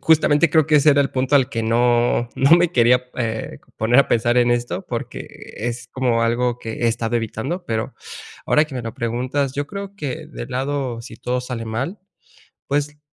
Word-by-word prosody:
justamente 160 Hz, 0 st, +4 dB
creo 155 Hz, -1 st, +3 dB
que 150 Hz, -, +5 dB
ese 150 Hz, +1 st, +6 dB
era 145 Hz, -, +4 dB
el 140 Hz, -, +1 dB
punto 130 Hz, +2 st, 0 dB
al 135 Hz, -3 st, +4 dB
que 115 Hz, -1 st, -2 dB
no 120 Hz, +1 st, +2 dB
no 135 Hz, -, +3 dB
me 175 Hz, -1 st, +2 dB
quería, 125 Hz, -2 st, +4 dB
eh, 110 Hz, -3 st, -3 dB
c -, -, -29 dB
poner 120 Hz, +4 st, +3 dB
a 140 Hz, -, +6 dB
pensar 120 Hz, +1 st, +1 dB
en 120 Hz, 0 st, +4 dB
esto, 120 Hz, 0 st, -2 dB
porque -, -, -5 dB, 0.3 s
es 120 Hz, +1 st, -4 dB
como 120 Hz, -3 st, +1 dB
algo 120 Hz, +1 st, +1 dB
que 115 Hz, -1 st, -5 dB
he -, -, +4 dB
estado 115 Hz, 0 st, 0 dB
evitando. 115 Hz, -, -3 dB
Pero 110 Hz, -1 st, -2 dB, 0.5 s
ahora 150 Hz, -, +4 dB
que 140 Hz, -4 st, -8 dB
me 120 Hz, -, -4 dB
lo 115 Hz, -1 st, -6 dB
preguntas, 125 Hz, +4 st, -1 dB
yo 145 Hz, +1 st, -3 dB
creo 200 Hz, +2 st, -7 dB
que 155 Hz, 0 st, -5 dB
del 150 Hz, -, -8 dB
lado, 130 Hz, -2 st, -2 dB
si 115 Hz, -, -10 dB
todo 125 Hz, +1 st, -2 dB
sale 125 Hz, -2 st, -5 dB
mal, 130 Hz, -, -3 dB, 0.7 s
pues 145 Hz, +1 st, -1 dB
125 Hz, 200 wpm, -21 LUFS, 115-145 Hz, 0.7 s, ese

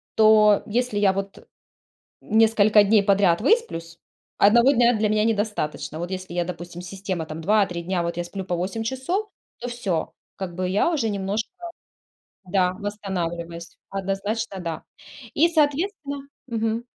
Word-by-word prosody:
То 215 Hz, -1 st, +6 dB
если 240 Hz, 0 st, -1 dB
я, 200 Hz, -2 st, +4 dB
вот, 195 Hz, 0 st, -6 dB, 0.8 s
несколько 215 Hz, -1 st, +4 dB
дней 205 Hz, 0 st, +4 dB
подряд 195 Hz, -4 st, +3 dB
высплюсь, 235 Hz, -, 0 dB, 0.4 s
1 235 Hz, +6 st, +6 dB
дня 245 Hz, -2 st, +4 dB
для 215 Hz, 0 st, +2 dB
меня 215 Hz, 0 st, +2 dB
недостаточно, 205 Hz, -8 st, -2 dB
вот 175 Hz, +2 st, -4 dB
если 185 Hz, -2 st, -6 dB
я, 175 Hz, 0 st, 0 dB
допустим, 175 Hz, 0 st, -7 dB
система, 185 Hz, -2 st, -4 dB
там, 155 Hz, +1 st, -7 dB
2-3 195 Hz, -1 st, +1 dB
дня 175 Hz, 0 st, -1 dB
вот 170 Hz, 0 st, -3 dB
я 175 Hz, -, -1 dB
сплю 190 Hz, +2 st, -6 dB
по 180 Hz, -, -2 dB
8 190 Hz, +6 st, -3 dB
часов, 265 Hz, -, -2 dB, 0.3 s
то 245 Hz, -, -5 dB
всё. 210 Hz, -9 st, -2 dB, 0.2 s
Как 185 Hz, -3 st, -5 dB
бы 185 Hz, +1 st, -2 dB
я 200 Hz, -, +2 dB
уже 280 Hz, -9 st, 0 dB
немножко, 200 Hz, +2 st, -2 dB, 0.9 s
да, 180 Hz, -1 st, +1 dB
восстанавливаюсь. 175 Hz, -5 st, -5 dB
Однозначно, 195 Hz, +2 st, -3 dB
да. 165 Hz, -2 st, -4 dB, 0.5 s
И, 335 Hz, +3 st, +4 dB
соответственно, 295 Hz, -2 st, -1 dB, 0.2 s
мгм, 225 Hz, -1 st, -2 dB
205 Hz, 145 wpm, -24 LUFS, 180-225 Hz, 0.9 s, То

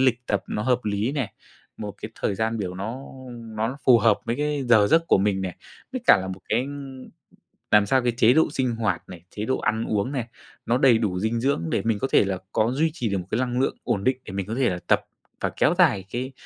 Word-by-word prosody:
lịch 125 Hz, -2 st, +2 dB
tập 100 Hz, -, 0 dB
nó 105 Hz, -, -2 dB
hợp 125 Hz, 0 st, +2 dB
lý 105 Hz, +5 st, -1 dB
nè, 135 Hz, -8 st, -2 dB, 0.4 s
một 105 Hz, -2 st, -6 dB
cái 110 Hz, -, -5 dB
thời 100 Hz, -, +1 dB
gian 110 Hz, +2 st, -1 dB
biểu 90 Hz, -3 st, -3 dB
nó 110 Hz, +7 st, -5 dB, 0.6 s
nó 115 Hz, +5 st, -1 dB
phù 120 Hz, -3 st, +7 dB
hợp 110 Hz, -2 st, +3 dB
với 115 Hz, -, -2 dB
cái 150 Hz, -1 st, -1 dB
giờ 110 Hz, -4 st, +6 dB
giấc 165 Hz, +8 st, +3 dB
của -, -, +4 dB
mình 100 Hz, 0 st, +1 dB
nè, 95 Hz, -2 st, -4 dB, 0.4 s
với 255 Hz, -, -3 dB
cả 110 Hz, -, +8 dB
là 95 Hz, -, -5 dB
một 95 Hz, 0 st, -6 dB
cái 120 Hz, +4 st, +1 dB, 1.1 s
làm 105 Hz, -1 st, +6 dB
sao 130 Hz, +5 st, +2 dB
cái 120 Hz, -, +2 dB
chế 120 Hz, +1 st, +5 dB
độ 160 Hz, -, +4 dB
sinh 130 Hz, -4 st, -1 dB
hoạt 105 Hz, -6 st, -2 dB
này, 90 Hz, -2 st, -10 dB
chế 105 Hz, +2 st, -5 dB
độ 130 Hz, -, 0 dB
ăn 110 Hz, +1 st, -1 dB
uống 105 Hz, +5 st, -1 dB
này, 125 Hz, -5 st, -3 dB, 0.4 s
nó 120 Hz, -, +2 dB
đầy 130 Hz, -3 st, +5 dB
đủ 100 Hz, -5 st, -1 dB
dinh 110 Hz, +4 st, 0 dB
dưỡng 135 Hz, -9 st, +1 dB
để -, -, 0 dB
mình 110 Hz, -3 st, +1 dB
có 135 Hz, -, -1 dB
thể -, -, +5 dB
là 95 Hz, -1 st, -2 dB
có 110 Hz, +3 st, +1 dB
duy 155 Hz, +5 st, +1 dB
trì 120 Hz, -8 st, -2 dB
được 100 Hz, -, 0 dB
một 90 Hz, -1 st, -6 dB
cái 110 Hz, -, +1 dB
lăng 125 Hz, -1 st, -1 dB
lượng -, -, 0 dB
ổn 100 Hz, -, -1 dB
định, 130 Hz, +2 st, +2 dB
để 95 Hz, -, -8 dB
mình 100 Hz, -1 st, -2 dB
có 110 Hz, -, -3 dB
thể 130 Hz, -1 st, +2 dB
là 90 Hz, -, -3 dB
tập -, -, +4 dB, 0.4 s
và -, -, 0 dB
kéo 160 Hz, -, +4 dB
dài 120 Hz, -, +3 dB
cái 130 Hz, +3 st, -3 dB
115 Hz, 255 wpm, -24 LUFS, 100-130 Hz, 1.1 s, cả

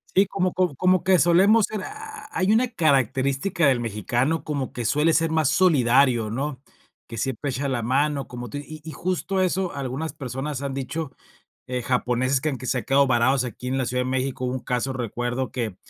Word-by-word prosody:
Sí, 195 Hz, -, +6 dB
como 185 Hz, -2 st, -1 dB
co 180 Hz, -5 st, +1 dB
como 185 Hz, +4 st, +2 dB
que 185 Hz, -1 st, +4 dB
solemos 195 Hz, +6 st, +5 dB
ser, 210 Hz, -3 st, -4 dB
ah, 435 Hz, +1 st, -9 dB
hay 185 Hz, +3 st, +1 dB
una 235 Hz, +3 st, +3 dB
característica 140 Hz, -, +1 dB
del 130 Hz, -3 st, +3 dB
mexicano 120 Hz, +7 st, -1 dB
como 140 Hz, -4 st, -3 dB
que 120 Hz, -, -5 dB
suele 150 Hz, +7 st, +2 dB
ser 165 Hz, 0 st, +2 dB
más 160 Hz, -3 st, +2 dB
solidario, 130 Hz, -9 st, +3 dB
¿no? 135 Hz, +1 st, -3 dB, 0.5 s
Que 115 Hz, -, -8 dB
siempre 135 Hz, +3 st, -2 dB
echa 140 Hz, +3 st, -2 dB
la 125 Hz, -3 st, -1 dB
mano, 140 Hz, +3 st, 0 dB
como 125 Hz, -1 st, -7 dB
tú 145 Hz, -, -5 dB
y 155 Hz, +1 st, -9 dB
y 160 Hz, -, -7 dB
justo 185 Hz, +3 st, -2 dB
eso 185 Hz, 0 st, 0 dB
algunas 140 Hz, +3 st, -4 dB
personas 140 Hz, 0 st, -5 dB
han 140 Hz, -1 st, -3 dB
dicho, 140 Hz, +2 st, -4 dB, 0.6 s
eh, 125 Hz, 0 st, -2 dB
japoneses 125 Hz, +1 st, 0 dB
que 155 Hz, -, 0 dB
aunque 130 Hz, -2 st, -5 dB
se 125 Hz, 0 st, 0 dB
ha -, -, -5 dB
quedado 140 Hz, 0 st, +3 dB
varados 130 Hz, +2 st, +3 dB
aquí 125 Hz, +2 st, -7 dB
en 130 Hz, +1 st, -1 dB
la 130 Hz, -, 0 dB
Ciudad 125 Hz, +1 st, -1 dB
de 130 Hz, -, -3 dB
México, 130 Hz, 0 st, -2 dB
hubo 125 Hz, -, -2 dB
un 130 Hz, -, -2 dB
caso, 125 Hz, +2 st, -1 dB
recuerdo 120 Hz, 0 st, -3 dB
que 115 Hz, -6 st, -3 dB
135 Hz, 205 wpm, -24 LUFS, 125-165 Hz, 0.6 s, Sí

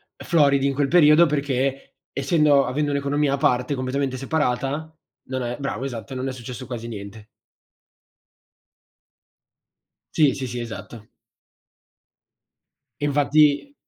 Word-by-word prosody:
floridi 140 Hz, -4 st, +2 dB
in 140 Hz, -, 0 dB
quel 140 Hz, -1 st, +1 dB
periodo 165 Hz, 0 st, +6 dB
perché 135 Hz, -2 st, -2 dB, 0.2 s
essendo 145 Hz, -2 st, +3 dB
avendo 145 Hz, +3 st, -1 dB
un'economia 140 Hz, 0 st, 0 dB
a -, -, 0 dB
parte 125 Hz, +1 st, +1 dB
completamente 130 Hz, 0 st, -2 dB
separata, 140 Hz, +2 st, -2 dB, 0.3 s
non 130 Hz, 0 st, -4 dB
è 120 Hz, +2 st, -4 dB
bravo, 135 Hz, -1 st, -4 dB
esatto, 120 Hz, -2 st, -6 dB
non 130 Hz, +1 st, -3 dB
è -, -, -2 dB
successo 125 Hz, +1 st, -8 dB
quasi 120 Hz, -2 st, -6 dB
niente. 105 Hz, 0 st, -9 dB, 2.9 s
Sì, 150 Hz, -4 st, +4 dB
sì, 130 Hz, -, -4 dB
sì, 120 Hz, +1 st, -5 dB
esatto. 115 Hz, -1 st, -8 dB, 2.0 s
Infatti 145 Hz, -, +2 dB
135 Hz, 110 wpm, -23 LUFS, 125-145 Hz, 2.9 s, periodo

